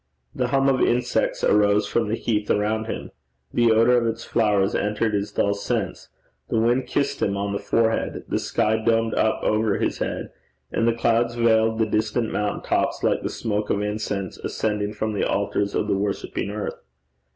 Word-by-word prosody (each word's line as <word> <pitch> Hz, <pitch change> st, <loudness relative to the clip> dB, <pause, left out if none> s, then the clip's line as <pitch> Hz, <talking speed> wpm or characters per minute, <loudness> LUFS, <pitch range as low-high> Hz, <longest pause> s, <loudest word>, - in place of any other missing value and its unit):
The 125 Hz, -, -1 dB
hum 135 Hz, +2 st, +2 dB
of 135 Hz, -1 st, +2 dB
insects 120 Hz, +1 st, +1 dB
arose 105 Hz, 0 st, +4 dB
from 115 Hz, +1 st, 0 dB
the 110 Hz, -, 0 dB
heath 105 Hz, -3 st, -1 dB
around 110 Hz, +2 st, +1 dB
him; 115 Hz, -, -5 dB, 0.4 s
the 120 Hz, -1 st, +4 dB
odour 115 Hz, +3 st, +5 dB
of 115 Hz, -1 st, +1 dB
its 115 Hz, 0 st, -3 dB
flowers 105 Hz, -4 st, +2 dB
entered 105 Hz, +1 st, 0 dB
his 100 Hz, 0 st, -1 dB
dulled 100 Hz, 0 st, 0 dB
sense; 100 Hz, -3 st, -3 dB, 0.4 s
the -, -, 0 dB
wind 120 Hz, +3 st, +2 dB
kissed 140 Hz, 0 st, -1 dB
him 100 Hz, -1 st, +1 dB
on 100 Hz, 0 st, -2 dB
the 100 Hz, -, -1 dB
forehead; 115 Hz, -1 st, 0 dB
the -, -, -1 dB
sky 110 Hz, +1 st, +1 dB
domed 115 Hz, 0 st, +2 dB
up 110 Hz, -, +1 dB
over 110 Hz, -1 st, +1 dB
his -, -, -1 dB
head; -, -, -3 dB, 0.4 s
and 115 Hz, -, +1 dB
the 115 Hz, -, +3 dB
clouds 115 Hz, 0 st, +1 dB
veiled 110 Hz, -1 st, +3 dB
the 110 Hz, -, +2 dB
distant 110 Hz, +1 st, 0 dB
mountain 105 Hz, 0 st, -2 dB
tops -, -, 0 dB
like -, -, +2 dB
the -, -, -2 dB
smoke 105 Hz, -2 st, -2 dB
of 100 Hz, -, 0 dB
incense 105 Hz, -3 st, -3 dB
ascending 105 Hz, -1 st, -2 dB
from 110 Hz, 0 st, -2 dB
the 100 Hz, -, -1 dB
altars 100 Hz, 0 st, 0 dB
of -, -, 0 dB
the 100 Hz, -, +1 dB
worshipping 100 Hz, 0 st, -2 dB
earth. 105 Hz, 0 st, -5 dB
110 Hz, 185 wpm, -23 LUFS, 105-115 Hz, 0.4 s, odour